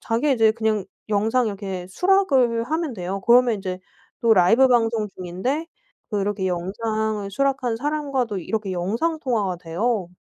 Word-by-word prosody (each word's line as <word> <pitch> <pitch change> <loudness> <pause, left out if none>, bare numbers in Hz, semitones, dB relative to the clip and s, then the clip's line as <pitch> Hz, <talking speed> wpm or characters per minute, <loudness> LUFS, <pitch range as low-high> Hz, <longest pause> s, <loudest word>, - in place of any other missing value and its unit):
자기 260 +4 +1
이제 225 -3 +4
그냥 220 -3 -1 0.2
영상 225 +4 +1
이렇게 195 -3 -5
수락을 270 - +2
하면 315 0 -2
돼요. 190 +1 -4
그러면 240 -1 +5
인제 185 -2 -5 0.4
또 230 -2 +4
라이브 220 +8 +5
방송 225 -3 +2
중인데 190 - -3 0.4
그렇게 200 -2 -1
영상을 210 +3 -2
수락한 260 0 0
사람과도 275 -6 -2
이렇게 205 +2 -3
영상 225 - -1
통화가 210 - -1
돼요. 180 +4 -2
220 Hz, 325 characters per minute, -23 LUFS, 195-255 Hz, 0.4 s, 그러면